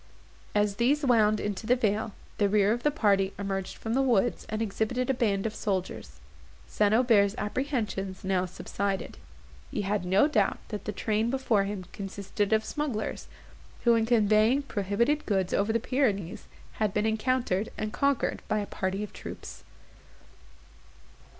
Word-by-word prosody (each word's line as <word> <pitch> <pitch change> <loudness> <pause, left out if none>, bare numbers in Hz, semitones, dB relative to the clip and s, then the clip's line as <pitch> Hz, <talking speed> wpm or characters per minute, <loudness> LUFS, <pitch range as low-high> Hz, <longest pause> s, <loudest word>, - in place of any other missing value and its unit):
As 205 -1 +2
these 280 +5 +2
wound 215 -4 +4
into 205 +1 -3
the 250 - +5
vale, 215 -2 0 0.3
the 205 -1 +3
rear 205 0 +3
of 240 - -3
the 295 - +3
party 200 -9 +2
emerged 195 -1 -3
from 225 - -3
the 265 - +3
woods, 240 -3 +1
and 215 - -2
exhibited 225 +4 -1
a - - +1
band 210 -5 0
of 220 - -1
soldiers. 190 -4 -3 0.5
St. 205 -1 +1
Aubert's 220 -3 +4
apprehensions 210 -5 -2
now 185 -1 +1
subsided; 195 +1 -3 0.5
he - - -2
had 200 -1 -1
no 190 +9 +4
doubt 300 - +1
that 210 -3 -5
the - - -2
train 215 +2 0
before 240 -6 +1
him 200 -2 -4
consisted 200 +1 -3
of 220 0 +3
smugglers, 270 -8 -3 0.6
who, 235 - +5
in 225 -1 +2
conveying 220 +3 +4
prohibited 235 +6 0
goods 190 -4 0
over 205 +2 +2
the 230 - +1
Pyrenees, 210 - -1 0.3
had 210 -3 +1
been 210 +1 +1
encountered, 220 -2 0
and 215 0 -3
conquered 280 -2 0
by 215 - +1
a 205 - -1
party 190 +1 -2
of 210 - -8
troops. - - -9
215 Hz, 155 wpm, -28 LUFS, 200-235 Hz, 0.6 s, the